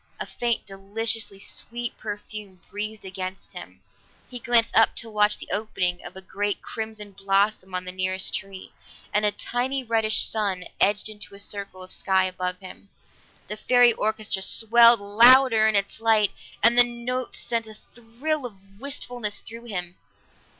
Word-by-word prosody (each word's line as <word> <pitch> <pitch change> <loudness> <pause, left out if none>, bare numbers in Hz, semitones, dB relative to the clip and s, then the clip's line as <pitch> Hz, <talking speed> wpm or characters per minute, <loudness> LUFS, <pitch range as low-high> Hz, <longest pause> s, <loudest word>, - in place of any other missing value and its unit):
A - - -3
faint, 235 -1 -2
deliciously 205 +2 -1
sweet 235 +4 -5
perfume 205 -2 -8
breathed 210 0 -5
against 185 0 -6
him; - - -11 0.5
he 245 - -6
glanced 235 -2 +3
up 225 - +4
to 225 - -3
watch 210 0 +2
the - - -11
opening 185 -4 -1
of - - -10
a 190 - -8
great 205 +2 -2
crimson 220 -2 -7
blossom 195 0 0
on 180 0 -3
the 180 - -4
nearest 185 0 -2
tree, 190 -1 -6 0.4
and 210 +1 +2
a 210 - +3
tiny 255 +5 -3
reddish 220 -2 +2
sun 200 -4 -1 0.2
edged 205 +2 +2
into 210 -1 -8
the 200 - -14
circle 200 -2 -5
of 185 - -10
sky 190 -1 +2
above 185 0 -3
him. 190 +1 -13 0.6
The 210 - -5
fairy 245 +1 +4
orchestra 215 -3 -2
swelled 230 +3 +5
louder 230 +2 +6
in 220 - +1
its 200 +2 0
light, 220 -3 +3 0.3
and 235 +2 +6
the - - +10
notes 245 +1 -3
sent 230 -2 -2
a 215 - -10
thrill 245 +7 -4
of 195 -2 -20
wistfulness 245 -5 -2
through 230 +1 -11
him. 180 -5 -6
215 Hz, 160 wpm, -24 LUFS, 195-230 Hz, 0.6 s, the